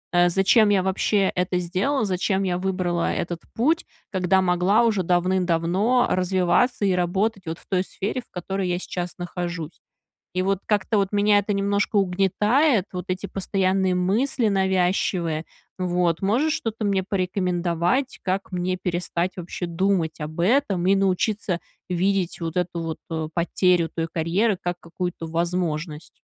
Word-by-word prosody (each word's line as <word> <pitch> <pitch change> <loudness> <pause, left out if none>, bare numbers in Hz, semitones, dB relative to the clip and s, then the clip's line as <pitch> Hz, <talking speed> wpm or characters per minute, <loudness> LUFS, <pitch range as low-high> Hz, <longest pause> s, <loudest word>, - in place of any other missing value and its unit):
э, 175 0 +5
зачем 200 +4 +4
я 195 -2 +3
вообще 190 +1 +1
это 180 0 0
сделала, 195 +9 0
зачем 190 +1 0
я 180 -2 0
выбрала 180 -2 0
этот 170 0 -3
путь, 315 +9 +2 0.3
когда 190 0 +2
могла 180 +5 +3
уже 215 -5 +2
давным-давно 180 +6 +2
развиваться 185 +5 +2
и 190 - +3
работать 190 +3 0
вот 160 - -3
в - - -23
той 185 -1 +1
сфере, 210 +7 -4
в - - -28
которой 190 +1 -3
я 175 - 0
сейчас 180 -1 -5
нахожусь. 175 -2 -5 0.5
И 185 - +1
вот 195 0 +1
как-то 210 0 +1
вот 195 0 0
меня 205 0 +4
это 205 +1 -1
немножко 200 +2 0
угнетает, 200 - +2
вот 180 0 -4
эти 185 +2 -2
постоянные 190 -1 0
мысли 220 +6 +1
навязчивые. 180 -4 +1 0.3
Вот. 175 -1 0
Можешь 255 +11 +2
что-то 225 -1 -3
мне 195 -2 +1
порекомендовать, 180 +4 0
как 190 +1 -2
мне 180 +1 -1
перестать 180 0 -2
вообще 175 0 -5
думать 170 -1 0
об 155 +2 -5
этом 195 -4 +2
и 195 - +5
научиться 195 -1 0 0.3
видеть 185 0 0
вот 165 +1 -4
эту 175 -1 -1
вот, 160 -1 -4
э, 160 -1 -2
потерю 175 0 +2
той 165 0 -2
карьеры 180 +5 +1
как 175 0 -3
какую-то 175 -1 -5
возможность. 165 -2 -3
185 Hz, 150 wpm, -24 LUFS, 175-200 Hz, 0.5 s, э